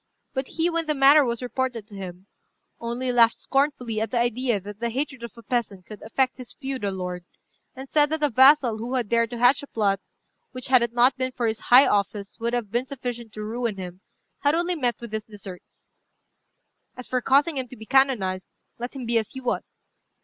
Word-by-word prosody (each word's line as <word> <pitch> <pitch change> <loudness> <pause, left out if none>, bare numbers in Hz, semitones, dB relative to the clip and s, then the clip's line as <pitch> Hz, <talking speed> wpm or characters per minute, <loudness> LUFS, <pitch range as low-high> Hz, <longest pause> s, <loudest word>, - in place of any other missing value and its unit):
But 265 -1 -3
he, 330 +1 -1
when 335 -2 -1
the 305 - +1
matter 280 +2 +7
was 235 -1 -3
reported 250 -3 -3
to 210 - -12
him, 185 -1 -8 0.5
only 240 +2 -3
laughed 235 -2 +5
scornfully 260 -6 -1
at 220 - -1
the 245 - -1
idea 240 -1 +1
that 205 +2 -10
the 235 0 -1
hatred 265 +1 -3
of 235 -1 -8
a 230 - -12
peasant 205 -5 -3
could 215 - -11
affect 255 +4 0
his 255 -2 -9
feudal 265 -7 -4
lord; 180 -1 -5 0.5
and 265 +1 -8
said 295 +1 +3
that 315 0 -2
a 295 - +2
vassal 260 -2 +5
who 240 +4 -4
had 240 -5 -1
dared 230 -1 +2
to 240 - -6
hatch 245 +3 +4
a 285 - -10
plot 200 -5 0 0.5
which, 255 0 -7
had 255 -2 +6
it 235 -1 0
not 245 +2 +4
been 255 0 -1
for 245 - -2
his 225 0 -1
high 255 +5 +7
office, 200 +1 -1
would 235 +1 -2
have 235 -5 -2
been 240 +3 -1
sufficient 245 -4 -6
to 215 - -6
ruin 225 -1 -3
him, 180 0 -8 0.4
had 290 +2 +2
only 345 +2 0
met 250 -8 -1
with 235 -2 -9
his 220 0 -3
deserts. 200 -4 -12 1.1
As 250 - -7
for 255 -1 -1
causing 280 +5 +3
him 260 -1 -2
to 255 - -12
be 220 - -10
canonized, 220 -9 +2 0.3
let 245 +3 -6
him 260 -3 -6
be 230 0 +2
as 220 - -5
he 265 - -8
was. 250 -2 -4
240 Hz, 215 wpm, -24 LUFS, 220-265 Hz, 1.1 s, matter